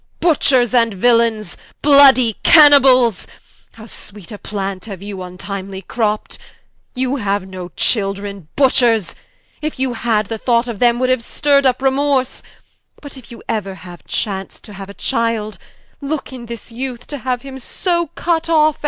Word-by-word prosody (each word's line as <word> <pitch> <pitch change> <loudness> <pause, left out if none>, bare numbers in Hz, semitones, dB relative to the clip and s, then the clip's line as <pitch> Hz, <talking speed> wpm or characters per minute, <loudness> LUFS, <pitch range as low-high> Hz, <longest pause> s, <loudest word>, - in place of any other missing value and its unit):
Butchers 265 -7 +3
and 230 -4 +2
Villaines, 230 -2 +1 0.3
bloudy 270 -6 +6
Caniballes, 270 - +6 0.5
How 220 - -13
sweet 205 -4 -12
a 205 - -8
Plant 195 -1 -5
haue 205 -3 -7
you 200 0 -8
vntimely 190 +1 -7
cropt: 215 -2 -2 0.6
You 260 +2 -1
haue 200 -4 -2
no 185 -2 -8
children 200 -4 -1
(Butchers) 240 -9 +2 0.5
if 305 -1 -4
you 260 -1 -1
had, 225 -2 0
The 225 +2 -6
thought 235 +1 +1
of 230 -4 -6
them 240 -1 +3
would 255 +1 0
haue 255 - +3
stirr'd 280 +4 +1
vp 260 0 +1
remorse, 270 -1 0 0.6
But 285 -2 -11
if 260 -3 -13
you 235 - -12
euer 190 -5 -5
chance 195 -2 -3
to 210 - -12
haue 195 0 -8
a 200 - -11
Childe, 230 -4 -2 0.4
Looke 280 -1 -4
in 240 -2 -9
his 235 0 -9
youth 250 0 -6
to 290 - -7
haue 255 0 -2
him 265 +1 -10
so 340 +6 -2
cut 330 -1 -1
off. 310 -2 +3
235 Hz, 155 wpm, -17 LUFS, 205-265 Hz, 0.6 s, bloudy